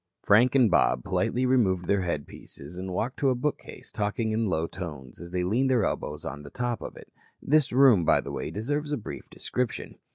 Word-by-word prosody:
Frank 120 +6 +5
and 125 -7 +5
Bob 60 -7 +3
politely 125 +2 0
removed 100 -9 +2
their 100 +2 +2
headpieces 75 -2 -6
and 95 +1 -5
walked 115 +8 -3
to 140 - +3
a 130 - +2
bookcase, 145 +4 -4
talking 105 +2 -1
in 110 0 0
low 80 -4 0
tones, 75 -8 -8
as 85 - -8
they 90 0 -1
leaned 120 +9 +1
their 120 -6 +3
elbows - - -3
on 70 +2 -5
the 70 - -10
top 120 - -3
of - - -8
it. - - -14 0.3
This 150 -1 +2
room, 125 -7 +6
by - - +4
the - - -7
way, - - -4
deserves 145 +8 -3
a 145 - 0
brief 110 - -8
description. 125 -2 -4
110 Hz, 205 wpm, -27 LUFS, 90-125 Hz, 0.3 s, room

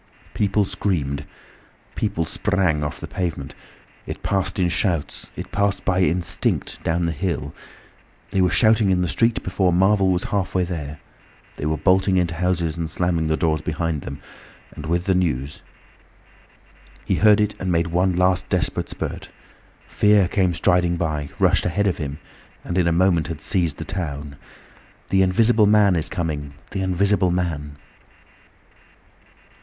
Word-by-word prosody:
People 100 0 +1
screamed. 80 -8 -2 0.7
People 80 - -1
sprang 90 -4 0
off 75 - -4
the - - -7
pavement: 80 -7 -4 0.5
It - - -6
passed 95 -1 -1
in 90 -2 +2
shouts, 85 -3 -2
it - - -7
passed 100 0 0
by 95 -1 +2
instinct 90 -1 -1
down 85 +1 0
the 85 - 0
hill. 85 +3 -3 0.8
They 95 - +1
were 90 - +4
shouting 110 +5 +4
in 90 -1 +2
the - - 0
street 115 +7 +1
before 95 0 +1
Marvel 95 +2 +3
was 90 0 0
halfway 95 -2 0
there. 75 -5 -5 0.6
They 75 - -3
were 80 0 0
bolting 95 +4 +3
into 85 -2 +1
houses 85 -1 -1
and 80 -1 -3
slamming 85 0 0
the 80 0 +1
doors 80 -3 +1
behind 80 -1 -2
them, 70 +2 -7 0.6
with 85 +3 -2
the 95 - +2
news. 75 -7 -1 1.4
He - - 0
heard 105 -1 +6
it 105 0 +1
and 95 -1 -2
made 85 -1 +2
one 90 +2 +1
last 90 +1 +2
desperate 90 -5 -1
spurt. - - -5 0.6
Fear 105 -3 +3
came 95 -3 +1
striding 90 +1 +2
by, 75 -4 -2
rushed - - +3
ahead 100 +4 0
of 95 -4 0
him, 70 -2 -4 0.5
and 85 - -4
in 90 -2 +2
a - - +3
moment 85 -1 +2
had 80 -2 -5
seized 85 -7 0
the - - -6
town. 75 -7 -5 0.7
"The 95 - +3
Invisible 110 +3 +4
Man 105 -3 +5
is 80 -1 0
coming! 75 -4 -4 0.2
The 95 - -3
Invisible 95 0 +2
Man!" 80 -5 -2
90 Hz, 155 wpm, -22 LUFS, 80-95 Hz, 1.4 s, heard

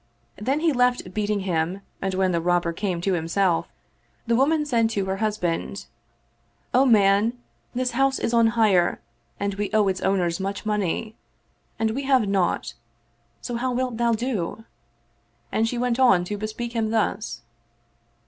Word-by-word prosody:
Then 270 +8 0
he 325 -2 +3
left 245 -7 +1
beating 210 0 -1
him 180 +1 -1 0.2
and 190 -1 -1
when 190 -1 +2
the 170 -1 0
Robber 175 0 +1
came 180 -1 -2
to 195 +2 0
himself, 170 +1 +1 0.6
the 235 0 +2
woman 300 +5 +2
said 230 -5 +2
to 200 -3 -1
her 190 0 -2
husband, 200 -3 -2 0.4
" - - -41
O 260 +2 +5
man, 210 +1 +4 0.4
this 250 0 0
house 270 +2 +2
is 230 - -2
on 230 -1 +5
hire 195 -6 +3 0.4
and 200 0 -1
we 205 +1 -3
owe 215 -2 +4
its 190 -1 -1
owners 180 -3 +1
much 195 +2 -4
money, 210 +1 -1 0.6
and 220 0 0
we 265 +5 -2
have 260 -6 +3
naught; 190 -10 0 0.7
so 240 - -4
how 255 +2 -1
wilt 250 -2 -2
thou 235 0 +2
do? 225 -3 -3 0.4
" - - -41
And 225 +1 +1
she 245 - -3
went 245 0 0
on 245 -9 +5
to 205 +3 -4
bespeak 220 +3 -4
him 225 -2 0
thus. 205 - -1
215 Hz, 165 wpm, -24 LUFS, 190-240 Hz, 0.7 s, O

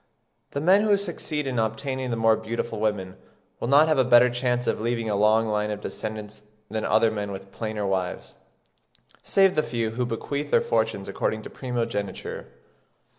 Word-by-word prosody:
The 140 - -3
men 185 +6 +5
who 210 -1 +3
succeed 165 -6 -3
in 130 -3 -1
obtaining 130 +4 -2
the 115 - -1
more 115 0 +4
beautiful 110 0 -4
women 100 -4 -2 0.4
will - - -3
not 145 +4 +6
have 155 -3 +2
a - - +6
better 125 0 +6
chance 120 0 0
of - - -1
leaving 115 0 -1
a - - +1
long 110 +2 +4
line 105 0 0
of 105 -1 -3
descendants 105 0 -6 0.3
than 110 0 -2
other 115 -1 +3
men 105 -2 -3
with 95 0 -8
plainer 110 -2 -4
wives, 95 -2 -2 0.9
save 195 -1 +4
the - - +2
few 115 -5 -2
who 120 +2 -2
bequeath 140 +5 -3
their - - +5
fortunes 110 -3 0
according 110 +2 -2
to - - -9
primogeniture. 115 -6 -4
115 Hz, 175 wpm, -25 LUFS, 105-130 Hz, 0.9 s, not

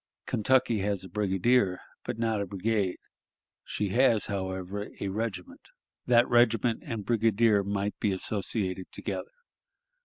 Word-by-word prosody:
Kentucky 120 0 +2
has 100 -1 -1
a 95 - -10
brigadier, 100 +1 +2 0.3
but - - -3
not 115 -2 0
a 100 - -3
brigade; 100 0 -1 0.7
she 105 -1 -2
has, 115 0 +3
however, 95 +1 -4
a 100 - -2
regiment 100 -3 -5 0.4
that 120 0 +5
regiment 120 -1 +3
and 115 -7 -5
brigadier 115 -2 +3
might 100 +1 -1
be 105 - +1
associated 95 -1 -2
together. - - -5
105 Hz, 125 wpm, -28 LUFS, 95-115 Hz, 0.7 s, that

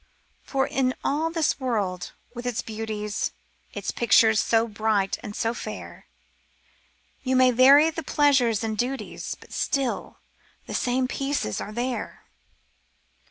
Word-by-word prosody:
For 270 -1 0
in 260 -1 0
all 310 +3 0
this 325 -4 0
world, 205 -9 -2 0.2
with 245 0 -6
its 245 -3 -2
beauties. 215 -1 -3 0.4
Its - - -4
pictures 220 -1 +4
so 225 0 +2
bright 210 -2 0
and 205 - -7
so 230 0 0
fair, - - -8 1.1
You 260 0 0
may 255 0 +6
vary 275 +6 +7
the 325 - -5
pleasures 265 -7 +2
and 220 -1 -1
duties 250 +5 -3
But - - -15
still, 270 -3 -1 0.5
the - - -7
same 255 +1 +1
pieces 275 - -2
are 210 - -6
there. 245 +3 -4
245 Hz, 130 wpm, -25 LUFS, 220-270 Hz, 1.1 s, vary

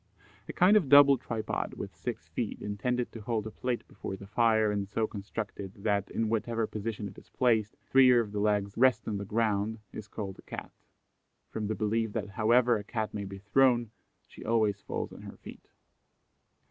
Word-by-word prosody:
A - - -4
kind 185 +4 +5
of 180 -10 +3
double 140 -1 +9
tripod 115 -4 -3
with - - -7
six - - -5
feet, - - -3
intended 120 +4 -2
to 115 - -9
hold 110 -1 -2
a 110 - -5
plate 125 +2 -3
before 95 - -6
the 100 - -10
fire 110 0 +3
and 100 -1 -2
so 110 +2 0
constructed 100 -2 -6
that, 100 -1 -1
in 115 - -1
whatever 115 +1 0
position 105 -1 -4
it 95 - -11
is - - -22
placed, 110 -4 +1
three 130 -1 +7
of 115 -3 +1
the 105 - -3
legs 100 -1 +1
rest 125 -2 +3
on 105 -2 -2
the 100 - -5
ground, 110 0 0 0.2
is 110 - -7
called 100 -2 -6
a - - -10
Cat, - - -8 0.8
from 110 -2 -3
the 110 - -1
belief 110 0 0
that 105 -3 -3
however 115 +3 +3
a 105 - -6
Cat 110 0 -3
may 100 -1 -4
be 100 0 -7
thrown, 120 +3 +3 0.4
she - - -12
always 110 -3 +1
falls - - -4
on - - -11
her - - -10
feet. - - -13
110 Hz, 195 wpm, -30 LUFS, 100-115 Hz, 0.8 s, double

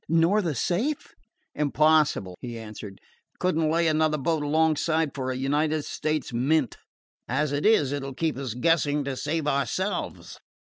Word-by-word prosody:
"Nor 165 +6 +3
the 165 -7 -2
safe?" 225 - -1 0.4
"Impossible," 150 -9 +2
he 120 -2 -6
answered. 105 -3 -9 0.4
"Could 185 -1 0
n't 160 -1 +1
lay 165 +1 +2
another 155 -1 +2
boat 155 +2 0
alongside 155 0 +1
for 130 -2 -3
a 130 - -2
United 150 +3 0
States 155 -5 -2
mint. 135 +2 +1 0.5
As 140 +4 0
it 145 +6 +1
is, 155 -12 +4
it 145 0 -2
'll 135 0 -6
keep 160 +1 -1
us 130 -4 -5
guessing 150 0 +2
to 140 -1 -3
save 150 +3 -2
ourselves." 150 +8 -2
150 Hz, 155 wpm, -26 LUFS, 135-160 Hz, 0.5 s, is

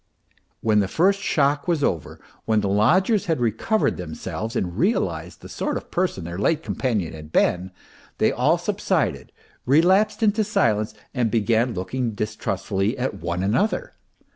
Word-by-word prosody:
When 110 -1 +3
the 100 - +1
first 190 - +2
shock 145 -4 +1
was 165 -5 +1
over, 80 - -2 0.3
when 110 -1 +2
the 100 - -1
lodgers 180 - +3
had 160 -5 +1
recovered 120 - +1
themselves 90 +6 -5
and 90 -2 -2
realized 205 +7 -1
the - - -10
sort - - -2
of - - -10
person 175 - -1
their 85 +2 -6
late 160 +9 +1
companion 110 - -1
had 75 -1 -10
been, 90 +2 +2 0.5
they - - +3
all - - +2
subsided, - - -1 0.3
relapsed 185 - +3
into 215 0 +3
silence 110 - +1 0.2
and 125 -4 +1
began 115 +2 +1
looking 115 +5 -3
distrustfully 105 +1 -2
at 130 -1 -1
one 85 +2 -2
another. 200 - 0
115 Hz, 150 wpm, -23 LUFS, 100-165 Hz, 0.5 s, When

